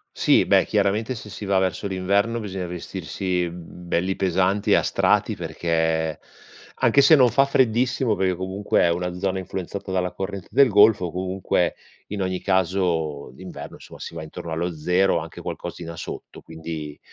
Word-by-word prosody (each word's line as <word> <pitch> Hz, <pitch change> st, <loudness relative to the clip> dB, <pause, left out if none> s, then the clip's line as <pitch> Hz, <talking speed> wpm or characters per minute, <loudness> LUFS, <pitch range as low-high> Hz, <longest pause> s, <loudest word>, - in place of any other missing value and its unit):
Sì, -, -, +4 dB
beh -, -, +4 dB
chiaramente 110 Hz, +5 st, 0 dB
se 105 Hz, -, -9 dB
si 105 Hz, 0 st, -7 dB
va 95 Hz, -1 st, +2 dB
verso 95 Hz, +2 st, 0 dB
l'inverno 100 Hz, +5 st, 0 dB
bisogna 95 Hz, -3 st, -4 dB
vestirsi, 90 Hz, +1 st, -3 dB
mhmm, 85 Hz, +1 st, -11 dB
belli 95 Hz, +3 st, 0 dB
pesanti 95 Hz, +2 st, +1 dB
e -, -, +7 dB
a -, -, +4 dB
strati -, -, +1 dB
perché, 80 Hz, -2 st, -1 dB, 0.6 s
anche 140 Hz, -, +4 dB
se 160 Hz, -, +7 dB
non 130 Hz, -4 st, +5 dB
fa 135 Hz, +4 st, +4 dB
freddissimo 125 Hz, -3 st, +2 dB
perché 95 Hz, -1 st, +1 dB
comunque 95 Hz, +3 st, 0 dB
è 85 Hz, -, +4 dB
una 90 Hz, +1 st, -1 dB
zona 95 Hz, 0 st, -1 dB
influenzata 95 Hz, +1 st, -6 dB
dalla 90 Hz, -1 st, 0 dB
corrente 95 Hz, -1 st, -6 dB
del 140 Hz, -1 st, +6 dB
Golfo, 105 Hz, -4 st, +5 dB
comunque 95 Hz, +1 st, -1 dB, 0.3 s
in 105 Hz, -1 st, -4 dB
ogni 95 Hz, -1 st, -2 dB
caso 85 Hz, -7 st, 0 dB
d'inverno, 90 Hz, +7 st, -9 dB
insomma, -, -, -13 dB
si -, -, -7 dB
va 80 Hz, -, -6 dB
intorno 80 Hz, +1 st, -8 dB
allo 85 Hz, +2 st, -2 dB
0 90 Hz, +5 st, +2 dB
o -, -, +2 dB
anche 80 Hz, +1 st, -9 dB
qualcosina 85 Hz, -1 st, -6 dB
sotto, -, -, -8 dB
quindi 80 Hz, -2 st, -7 dB
95 Hz, 170 wpm, -23 LUFS, 85-100 Hz, 0.6 s, e